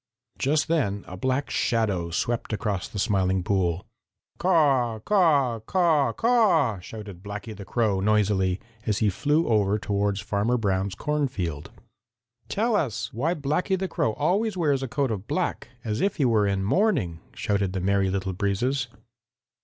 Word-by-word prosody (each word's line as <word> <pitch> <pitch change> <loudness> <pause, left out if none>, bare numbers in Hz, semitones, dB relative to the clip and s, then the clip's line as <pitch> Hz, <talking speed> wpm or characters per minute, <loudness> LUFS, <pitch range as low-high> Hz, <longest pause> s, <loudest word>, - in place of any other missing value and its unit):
Just 150 +3 +1
then 115 -12 0
a 90 - -7
black 130 +8 -1
shadow 100 -8 0
swept 115 +9 -2
across 105 -3 -2
the - - -8
Smiling 95 -2 +1
Pool. 90 -2 0 0.5
"Caw, 140 -10 +3
caw, 140 - +2
caw, 160 - +2
caw!" 195 - +3
shouted 100 -1 -9
Blacky 105 +2 -7
the 100 -1 -9
Crow 105 -1 +1
noisily, 100 -2 +2 0.3
as 105 -2 +1
he 105 -2 +2
flew 150 - +1
over 105 -2 +2
toward 100 -1 -1
Farmer 105 +5 0
Brown's 95 -3 -1
cornfield. 110 - -2 0.8
"Tell 225 +2 +1
us 135 - -1
why 155 +10 0
Blacky 155 +6 0
the 190 +1 -2
Crow 110 -9 0
always 190 - 0
wears 145 -6 +1
a 135 - -2
coat 135 +1 -1
of 105 -1 -4
black, - - -2 0.2
as 110 -2 -2
if 200 - +1
he 140 - +1
were 110 -4 +3
in 100 -1 0
mourning," 115 - +1 0.2
shouted 100 -2 -1
the 95 - -1
Merry 100 +1 +1
Little 95 0 -2
Breezes. 115 +7 0
110 Hz, 155 wpm, -25 LUFS, 100-145 Hz, 0.8 s, Caw